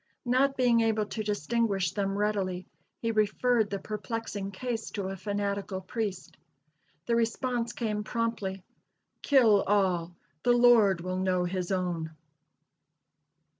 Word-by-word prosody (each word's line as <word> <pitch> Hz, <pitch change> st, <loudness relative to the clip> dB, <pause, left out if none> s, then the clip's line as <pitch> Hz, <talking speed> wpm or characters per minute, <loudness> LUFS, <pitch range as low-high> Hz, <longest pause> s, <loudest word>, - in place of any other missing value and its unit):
Not 265 Hz, +3 st, +2 dB
being 240 Hz, -2 st, +4 dB
able 220 Hz, -1 st, +1 dB
to 205 Hz, +2 st, -5 dB
distinguish 205 Hz, -2 st, 0 dB
them 195 Hz, -1 st, -1 dB
readily, 195 Hz, -3 st, -1 dB, 0.4 s
he 230 Hz, -, +1 dB
referred 220 Hz, +1 st, +2 dB
the 200 Hz, -, -2 dB
perplexing 210 Hz, 0 st, -4 dB
case 225 Hz, +2 st, -4 dB
to 195 Hz, -2 st, -4 dB
a 195 Hz, -, -4 dB
fanatical 200 Hz, 0 st, -3 dB
priest. 190 Hz, -1 st, -5 dB, 0.7 s
The 235 Hz, -, +1 dB
response 235 Hz, +1 st, 0 dB
came 215 Hz, -4 st, -2 dB
promptly: 215 Hz, -5 st, -2 dB, 0.6 s
"Kill 230 Hz, -8 st, +5 dB
all; 180 Hz, -4 st, +1 dB, 0.3 s
the 245 Hz, -, +4 dB
Lord 230 Hz, -7 st, +5 dB
will 185 Hz, +1 st, -3 dB
know 185 Hz, -1 st, +1 dB
his 180 Hz, 0 st, -3 dB
own!" 175 Hz, -4 st, -2 dB
205 Hz, 125 wpm, -29 LUFS, 190-230 Hz, 0.7 s, Kill